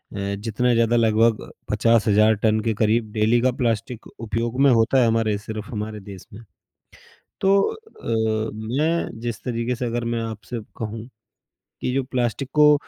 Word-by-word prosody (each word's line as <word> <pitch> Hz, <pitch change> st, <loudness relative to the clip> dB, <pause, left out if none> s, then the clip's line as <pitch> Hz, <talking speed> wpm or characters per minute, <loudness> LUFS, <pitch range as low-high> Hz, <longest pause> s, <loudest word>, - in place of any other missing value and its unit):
अ, 100 Hz, 0 st, -2 dB
जितना 120 Hz, +4 st, 0 dB
ज़्यादा 115 Hz, 0 st, +3 dB
लगभग 115 Hz, 0 st, +2 dB, 0.2 s
50,000 110 Hz, -1 st, +4 dB
टन 110 Hz, 0 st, +3 dB
के -, -, +1 dB
करीब 110 Hz, 0 st, +2 dB
डेली 110 Hz, +2 st, +2 dB
का 130 Hz, 0 st, +3 dB
प्लास्टिक 115 Hz, 0 st, -2 dB
उपयोग 115 Hz, +3 st, -3 dB
में 140 Hz, -2 st, +6 dB
होता 120 Hz, +3 st, +4 dB
है 115 Hz, -, +4 dB
हमारे 110 Hz, -2 st, +1 dB
सिर्फ़ 110 Hz, +3 st, -7 dB
हमारे 105 Hz, -1 st, -4 dB
देश 95 Hz, -2 st, -10 dB
में। 115 Hz, +3 st, -11 dB, 1.0 s
तो 195 Hz, +1 st, +4 dB
अ, 110 Hz, -, -2 dB, 0.3 s
मैं 160 Hz, -7 st, 0 dB
जिस 120 Hz, -2 st, -4 dB
तरीके 120 Hz, 0 st, -2 dB
से 125 Hz, +1 st, -3 dB
अगर 120 Hz, 0 st, -2 dB
मैं 115 Hz, -, -1 dB
आपसे 115 Hz, +2 st, -6 dB, 0.2 s
कहूँ 110 Hz, +1 st, -5 dB, 0.7 s
कि 125 Hz, -, -1 dB
जो 135 Hz, -, +1 dB
प्लास्टिक 125 Hz, +1 st, -2 dB
को 150 Hz, -1 st, +6 dB
115 Hz, 160 wpm, -23 LUFS, 110-125 Hz, 1.0 s, में